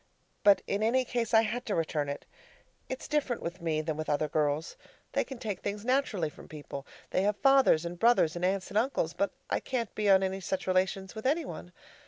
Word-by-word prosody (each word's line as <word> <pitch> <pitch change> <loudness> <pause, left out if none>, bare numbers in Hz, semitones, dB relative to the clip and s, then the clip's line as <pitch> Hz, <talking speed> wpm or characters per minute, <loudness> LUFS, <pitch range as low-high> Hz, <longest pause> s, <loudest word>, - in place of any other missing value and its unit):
But 200 -1 +6
in 200 - -1
any 250 +4 +2
case, 235 -3 -2
I 225 -1 +6
had 230 +3 -2
to 205 - 0
return 155 -3 -1
it. 140 - -5 0.6
It's 260 - -5
different 285 -5 -1
with 170 +2 -5
me 160 -2 0
than 155 -1 -3
with 155 - -4
other 150 +1 +1
girls. 150 +1 0 0.4
They - - +1
can 265 - -8
take 210 -5 -4
things 205 +1 -4
naturally 250 - +1
from - - -14
people. 145 -2 -8 0.2
They - - +2
have 205 +1 +1
fathers 270 - +5
and 170 0 -5
brothers 230 -9 +4
and 175 - -4
aunts 190 +1 0
and 210 - +2
uncles; 225 - 0
but 200 - 0 0.2
I - - +2
can't 235 -5 -3
be 210 -1 0
on 195 0 +6
any 190 0 -1
such 190 +1 -2
relations 190 +1 0
with 220 +2 -3
any 310 +3 +1
one. 175 - -8
195 Hz, 220 wpm, -30 LUFS, 165-235 Hz, 0.6 s, But